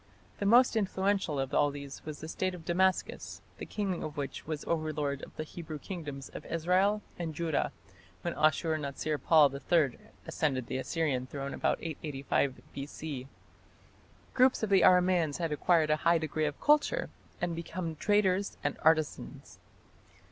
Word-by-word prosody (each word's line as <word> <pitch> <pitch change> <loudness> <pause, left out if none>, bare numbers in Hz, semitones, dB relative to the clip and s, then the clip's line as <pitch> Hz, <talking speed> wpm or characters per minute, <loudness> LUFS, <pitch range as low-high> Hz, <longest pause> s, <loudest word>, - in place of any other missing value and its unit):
The 200 - 0
most 240 +3 +6
influential 195 -6 0
of 135 +2 +1
these 140 -1 -8
was 155 -1 -7
the 155 - -6
State 185 +3 -2
of 165 -3 -12
Damascus, 185 +2 0 0.2
the - - -6
king 195 -4 -2
of 155 0 -6
which 140 0 -5
was 155 -2 -3
the - - -11
overlord 150 -3 -1
of - - -11
the 155 - -3
Hebrew 155 0 -7
kingdoms 145 -4 -6
of - - -8
Israel 185 +5 +2 0.2
and 165 -3 -3
Judah 165 -2 0 0.5
when - - -1
Ashur 155 +1 +2
natsir 150 +1 -3
pal 150 -4 +6
III 140 0 +1 0.3
ascended 135 -5 -1
the 130 - -3
Assyrian 135 -4 -1
throne 140 0 -5
about - - +1
885 140 -4 -2
B.C. 140 -1 -6 1.1
Groups 255 -2 +4
of 215 - -1
the 195 - +6
Aramaeans 180 -4 +4
had 165 -3 -2
acquired 155 +1 +3
a 155 - +3
high 170 +2 +3
degree 155 -1 -1
of 145 -1 -3
culture 300 +12 +2 0.3
and 175 -1 -1
become 165 0 -4
traders 200 +1 +1
and - - -1
artisans. 155 -1 0
160 Hz, 155 wpm, -31 LUFS, 145-180 Hz, 1.1 s, most